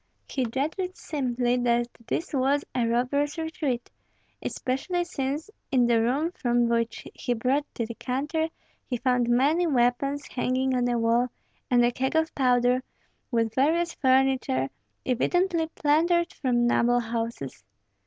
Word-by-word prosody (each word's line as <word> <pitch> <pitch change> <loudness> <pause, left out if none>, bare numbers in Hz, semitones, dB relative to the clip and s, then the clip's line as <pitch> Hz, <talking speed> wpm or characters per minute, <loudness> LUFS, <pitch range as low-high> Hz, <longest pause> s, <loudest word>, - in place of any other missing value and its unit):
He 260 -2 -1
judged 315 - -2
simply 250 -4 -1
that 240 -1 +2 0.2
this 330 +6 -2
was 275 +1 +2
a 245 -2 +1
robbers' 270 +6 0
retreat, 305 -6 -3 0.5
especially 310 +8 -2
since 300 +2 -3 0.2
in 250 -2 +4
the 235 -1 +3
room 275 +9 +1
from 240 -6 +1
which 230 0 -1
he 245 - -2
brought 265 +6 0
the 230 - -1
decanter 275 +7 -2 0.4
he 250 - -2
found 250 -1 +1
many 290 +8 +3
weapons 275 +1 +1
hanging 255 +1 0
on 245 -1 +1
the 245 -1 +1
wall, 230 +2 +2 0.4
and 245 -1 +5
a 240 - +2
keg 265 +4 -2
of 320 0 +1
powder, 250 -1 +3 0.5
with 230 -3 0
various 330 +7 +2
furniture, 260 - +2 0.3
evidently 335 +6 +1
plundered 340 +4 +2
from 245 -6 +1
noble 240 0 +3
houses. 225 - -4
255 Hz, 135 wpm, -26 LUFS, 240-295 Hz, 0.5 s, and